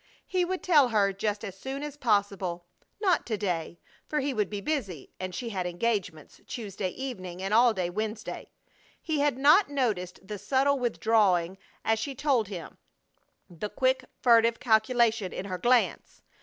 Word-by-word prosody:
He 365 -1 0
would 370 +1 -3
tell 300 -7 +5
her 200 -3 +2
just 205 +2 -2
as 195 -3 -7
soon 265 +7 -5
as 295 -1 -6
possible. 200 -8 0 0.3
Not 380 -5 +2
to 220 -3 -1
day, 170 -4 -3 0.3
for 300 - 0
he 280 0 -1
would 210 -4 0
be 205 - -4
busy, 200 - -3
and 185 -1 -5
she 240 +3 -4
had 185 -4 -2
engagements 175 -4 -3
Tuesday 205 -4 -4
evening 185 -7 -6
and 195 +2 -2
all 235 +2 +6
day 185 -5 -2
Wednesday. 215 +3 -4 0.5
He 315 -3 -2
had 285 -3 +2
not 295 +9 +5
noticed 215 -11 -1
the 210 -1 -5
subtle 270 +6 +2
withdrawing 205 -7 +2 0.3
as 225 0 +2
she 275 +4 -4
told 260 -6 +1
him, 185 -4 -8 0.7
the 180 +3 -6
quick, 260 +1 +1 0.2
furtive 230 -1 +5
calculation 220 -3 +2
in 190 - -5
her 185 -2 -4
glance. 240 +5 +1
220 Hz, 165 wpm, -28 LUFS, 190-260 Hz, 0.7 s, all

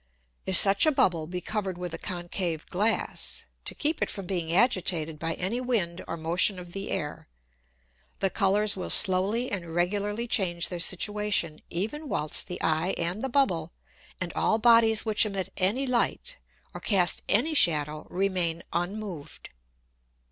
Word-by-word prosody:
If 190 - +2
such 200 +8 +7
a - - +5
Bubble 170 - +1
be 180 +1 -5
cover'd 195 -4 -4
with 180 -2 -6
a 165 - -5
concave 175 -3 -4
Glass, 210 +5 -1 0.2
to - - -2
keep 310 +1 -1
it - - 0
from 195 -2 -5
being 175 -3 -2
agitated 175 -7 +1
by 165 0 -3
any 210 +7 -3
Wind 200 -9 -2
or 165 - -5
Motion 175 +5 +2
of 175 -1 -10
the 195 +1 -5
Air, 150 0 -4 0.9
the 195 - 0
Colours 205 +1 +2
will 185 - -6
slowly 205 +6 +2
and 170 -4 -5
regularly 205 +5 -1
change 175 -7 0
their 175 - -5
situation, 195 -3 0
even 245 - -4
whilst 150 0 +1
the 180 -2 -6
Eye 160 +4 0
and 175 +7 -3
the 265 - -2
Bubble, 180 - 0 0.5
and 185 -2 -4
all 220 - +1
Bodies 225 -1 +4
which 215 -1 +4
emit 195 -3 -3
any 205 +9 +2
Light, 270 - -1 0.3
or - - -8
cast 180 -5 +2
any 280 +10 +3
Shadow, 155 - +2
remain 180 -3 0
unmoved. 175 -3 -5
190 Hz, 155 wpm, -26 LUFS, 170-215 Hz, 0.9 s, such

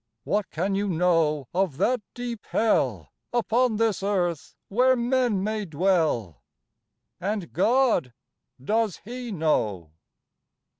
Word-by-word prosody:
What 205 -1 -1
can 190 +5 -1
you 200 +1 0
know 165 -6 +1
of 180 -6 0
that 240 +7 +1
deep 240 -3 -5
Hell 225 -1 0 0.2
Upon 240 0 +2
this 225 -2 +1
earth 180 -6 -1
where 255 +5 +3
men 240 -5 +1
may 215 +1 -1
dwell, 160 - 0 0.8
And 195 0 -3
God, 225 - +2 0.5
does 215 - 0
He 245 +1 -6
know? 110 - 0
200 Hz, 110 wpm, -25 LUFS, 165-230 Hz, 0.8 s, where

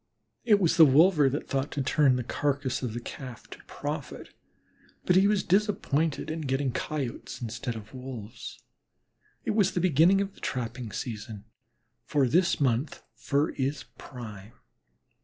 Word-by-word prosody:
It 210 -3 +5
was 170 -3 +2
the 165 - +10
wolver 150 +1 +6
that 145 +3 -4
thought 135 +1 -1
to 140 - -1
turn 130 0 +3
the 125 - -2
carcass 140 +1 -1
of 120 -4 -3
the - - -2
Calf 125 0 -9
to - - -11
profit, - - -6 0.8
but 180 - +3
he 190 +2 +6
was 210 -1 +2
disappointed 165 -6 0
in 160 0 -4
getting 135 -1 0
Coyotes 135 -1 -4
instead 120 +1 -4
of 110 +1 -10
Wolves. 125 -3 -8 0.8
It - - +1
was 205 -3 +2
the - - 0
beginning 175 +2 +4
of 200 0 -2
the - - -19
trapping 120 -2 -4
season, 105 -3 -6 0.6
for 140 -3 +1
this 170 +8 +2
month 130 +1 0
fur 140 +2 0
is 135 0 -2 0.2
prime. 110 -5 -9
135 Hz, 155 wpm, -28 LUFS, 120-160 Hz, 0.8 s, the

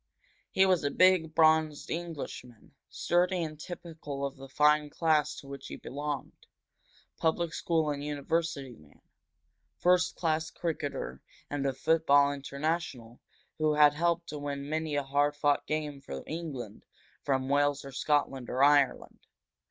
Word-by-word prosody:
He 190 - +4
was 185 -4 +2
a 145 - +1
big, 180 -1 +4
bronzed 155 -2 +3
Englishman, 155 -8 -6 0.2
sturdy 180 0 +1
and 155 -2 -6
typical 155 -5 -6
of 140 - -5
the 135 0 -11
fine 150 +1 +3
class 150 -1 +1
to 140 - -11
which 140 -1 -8
he - - -7
belonged 145 0 -6 0.7
public 165 0 0
school 160 -5 0
and 145 0 -4
university 150 -1 -2
man, 75 -7 -20 0.8
first 180 0 +3
class 160 -1 0
cricketer 145 - -4 0.3
and 140 -1 -1
a 135 - 0
football 145 -1 +3
international 140 -4 -4 0.4
who 155 -1 +2
had 150 -1 +6
helped 170 +2 0
to 150 - -5
win 140 -1 -4
many 155 0 -2
a 145 - +1
hard 145 +2 +1
fought 145 -1 +1
game 150 -2 -3
for 70 - -7
England 140 -10 -6 0.4
from 130 -1 0
Wales 145 0 +1
or 135 - -8
Scotland 135 -2 0
or 130 +2 +1
Ireland. 145 -2 +3
150 Hz, 145 wpm, -30 LUFS, 140-160 Hz, 0.8 s, had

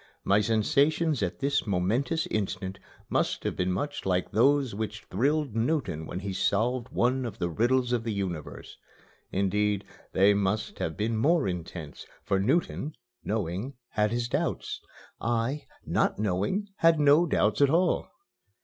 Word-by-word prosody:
My 100 +2 +4
sensations 140 +7 +2
at 90 +7 -2
this 140 -3 +1
momentous 115 - 0
instant 95 -2 -2 0.3
must - - 0
have - - -2
been 90 0 0
much 145 +10 -3
like 90 -1 0
those 135 +3 +3
which 110 +1 -4
thrilled 140 +4 +1
Newton 115 - -1
when 90 - -5
he 100 0 -4
solved 120 +6 0
one 130 +2 +1
of 115 -4 -5
the 85 - -1
riddles 125 +6 +2
of 120 -2 0
the 115 - -2
universe. 95 -7 -5 0.5
Indeed, 100 +1 +1 0.3
they 100 +2 +5
must 100 +1 -1
have 80 - -3
been 110 +1 0
more 155 - +3
intense, 85 -4 -6 0.2
for 95 -1 +1
Newton, 145 - 0 0.3
knowing, 105 +5 -2
had 105 -1 +1
his 120 +1 -1
doubts; - - -2 0.4
I, 120 +5 -1 0.2
not - - +1
knowing, 105 - -1
had 165 -1 +4
no 150 +4 +5
doubts 110 -4 +2
at 140 - +6
all. 175 +4 +2
110 Hz, 150 wpm, -28 LUFS, 95-140 Hz, 0.5 s, at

